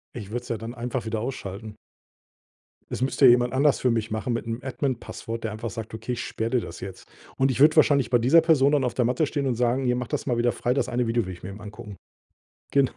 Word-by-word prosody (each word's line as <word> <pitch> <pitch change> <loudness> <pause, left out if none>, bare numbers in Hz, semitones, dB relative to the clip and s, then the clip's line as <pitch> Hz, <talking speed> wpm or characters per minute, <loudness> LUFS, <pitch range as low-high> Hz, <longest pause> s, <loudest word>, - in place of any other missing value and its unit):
Ich 105 -4 -7
würde 120 +2 -2
es 120 - -14
ja 115 - -1
dann 115 +3 -7
einfach 125 0 -4
wieder 110 0 -2
ausschalten. 110 -4 -6 1.2
Es - - -4
müsste 135 +1 +4
jemand 120 0 +5
anders 140 +2 +3
für 125 - +2
mich 115 -1 -1
machen 110 +3 -2
mit 115 0 -3
'nem 115 +2 -3
Admin 130 -2 -2
Passwort, 115 0 -7
der 110 - -2
einfach 110 +2 -5
sagt: 110 +2 -7
„Okay, 120 +2 -4
ich 120 - -4
sperre 115 +1 -3
dir 125 -2 +2
das 85 - -8
jetzt.“ 95 -1 -9 0.3
Und 135 0 +3
ich 130 - -3
würde 155 +2 +6
wahrscheinlich 140 -5 +4
bei 120 - +4
dieser 130 +8 +5
Person 150 -4 +4
dann 145 -3 +2
auf 125 - -1
der 125 - +2
Matte 130 +6 +1
stehen 140 -2 -2
und 130 - +1
sagen: 125 +2 +1
„Hier, 125 0 +2
mach 125 -2 -3
das - - -3
mal 120 -3 0
wieder 120 0 +3
frei. 120 +1 -1
Das 140 - -1
eine 125 0 0
Video 115 -1 +1
will 95 - -5
ich 85 - -14
mir 95 - -6
eben 100 +2 -9
angucken.“ 105 -1 -9 0.8
Genau. 140 -2 +3
120 Hz, 265 wpm, -25 LUFS, 115-130 Hz, 1.2 s, würde